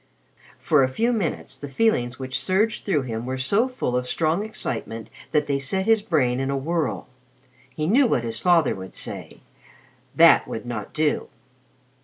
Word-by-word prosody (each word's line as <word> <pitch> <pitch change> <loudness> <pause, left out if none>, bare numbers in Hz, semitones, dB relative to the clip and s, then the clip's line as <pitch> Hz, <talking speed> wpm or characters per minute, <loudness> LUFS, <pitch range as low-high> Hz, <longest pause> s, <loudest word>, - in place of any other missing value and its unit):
For 150 -3 +3
a 130 - +4
few 230 - 0
minutes 195 -9 -2
the 145 - -8
feelings 130 - +1
which 130 -1 -3
surged 210 +4 +1
through 155 -9 +1
him 115 -1 -5
were 130 0 -2
so 200 - +2
full 255 - -3
of 125 0 -1
strong 165 +8 0
excitement 115 - -5 0.2
that 150 -1 +2
they 140 -1 0
set 190 +8 -1
his 225 -1 +4
brain 135 - +1
in 135 0 -1
a 140 - 0
whirl. 160 +1 -2 0.6
He 155 - -4
knew 245 - +4
what 125 - +1
his 115 -1 -2
father 170 -3 +3
would 95 0 -9
say - - -8 0.7
that - - +6
would 110 - -6
not 115 -4 -5
do. 155 -1 0
145 Hz, 175 wpm, -24 LUFS, 125-190 Hz, 0.7 s, that